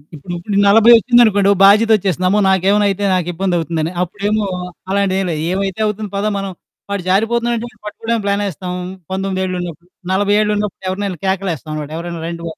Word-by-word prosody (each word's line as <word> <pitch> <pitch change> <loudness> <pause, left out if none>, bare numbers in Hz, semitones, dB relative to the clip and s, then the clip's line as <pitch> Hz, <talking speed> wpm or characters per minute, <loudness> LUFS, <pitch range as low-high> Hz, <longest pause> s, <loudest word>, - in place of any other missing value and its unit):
ఇప్పుడు 175 +6 -5
40 225 +3 +6
వచ్చిందనుకోండి 220 -4 +4
ఓ - - +6
బాధ్యత 215 +3 +5
ఒచ్చేస్తది. 185 -2 -1
అమ్మో! 205 +3 +2
నాకేమైనా 195 +2 +3
అయితే 200 +1 -2
నాకు 180 -2 -1
ఇబ్బంది 185 0 -1
అవుతుందని. 165 0 -2
అప్పుడేమో 205 +3 -2 0.5
అలాంటిది 195 -1 +1
ఏమి 185 - -2
లేదు, 155 -1 -3
ఏమైతే 195 +1 -2
అవుతుంది 210 0 -4
పద 205 - -1
మనం 195 -1 -4 0.4
వాడు 200 -3 -2
జారిపోతున్నాడు 235 +4 +1
అంటే 240 +2 -5 0.2
పట్టుకోవడానికి 225 +1 -3
ప్లానేస్తాం 200 -3 -2 0.4
19 190 0 -2
ఏళ్ళు 185 0 -3
ఉన్నప్పుడు. 175 0 -8 0.2
40 205 +2 +2
ఏళ్ళు 210 0 +1
ఉన్నప్పుడు, 205 -2 -4
ఎవరినైనా 190 -2 -3
కేకలెస్తాం 175 -6 -2 0.2
ఎవరైనా 170 -1 -6
రండి 170 0 -6
బాబు 160 - -7
195 Hz, 170 wpm, -17 LUFS, 180-210 Hz, 0.5 s, 40